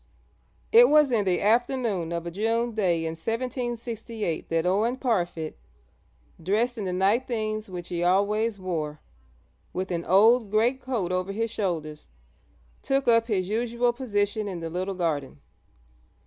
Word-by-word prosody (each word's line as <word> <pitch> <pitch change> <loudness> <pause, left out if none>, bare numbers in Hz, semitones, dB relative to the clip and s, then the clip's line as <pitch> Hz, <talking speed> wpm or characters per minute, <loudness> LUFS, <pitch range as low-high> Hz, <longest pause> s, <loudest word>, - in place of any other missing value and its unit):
It 470 +2 +8
was 300 -3 +5
in 215 -4 +2
the 180 -2 +1
afternoon 225 -5 +1
of 170 0 -3
a 170 - -4
June 225 +5 0
day 175 -6 +1
in 160 - -2
1768 230 - -4
that 165 0 0
Owen 215 +7 +1
Parfitt, 175 - -2 0.8
dressed 220 +8 +1
in 215 -4 -4
the 185 - -2
night 195 +7 +2
things 215 -3 -3
which 175 -2 -7
he 175 0 -2
always 205 +4 +2
wore, 160 -5 -4 0.7
with 185 +1 -3
an 170 -1 -2
old 220 +4 +5
greatcoat 235 -2 0
over 185 +1 -1
his 225 +2 -2
shoulders, 160 - -3 0.7
took 275 0 0
up 230 -1 +4
his 190 -5 0
usual 235 +3 0
position 210 -4 -1
in 185 -3 -4
the 165 -1 -5
little 185 +3 -3
garden. 150 - -2
205 Hz, 145 wpm, -26 LUFS, 180-235 Hz, 0.8 s, It